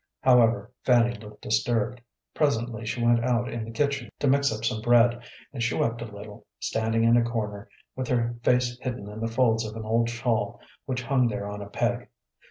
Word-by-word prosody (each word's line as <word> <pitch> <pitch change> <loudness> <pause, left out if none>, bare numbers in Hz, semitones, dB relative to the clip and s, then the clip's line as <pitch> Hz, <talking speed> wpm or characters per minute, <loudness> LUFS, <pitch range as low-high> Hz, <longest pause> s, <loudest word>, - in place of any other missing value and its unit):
However, 120 -3 +4
Fanny 120 -1 +4
looked 105 -1 -12
disturbed. 115 - 0 0.3
Presently 120 -6 0
she 120 +1 -1
went 120 0 +4
out 120 0 +1
in 115 -3 -4
the - - -9
kitchen 140 0 -1
to - - -2
mix 140 +1 +3
up 110 +1 -4
some 110 -2 -1
bread, 120 0 +4 0.3
and 130 - -5
she 115 0 0
wept 115 0 0
a - - -3
little, 105 -1 -11
standing 115 0 0
in 115 +1 +5
a 120 - +4
corner, 110 -2 -4 0.3
with 130 -1 -3
her 120 -1 +1
face 125 0 +1
hidden 120 -6 -4
in 105 +1 -8
the 115 - -1
folds 115 -1 +2
of 110 0 -6
an 110 -1 -6
old 115 +1 +1
shawl 115 -1 -1 0.3
which 125 -1 -2
hung 125 0 +2
there 105 -2 -3
on 105 0 -6
a 100 - -8
peg. - - -1
115 Hz, 200 wpm, -26 LUFS, 110-125 Hz, 0.3 s, in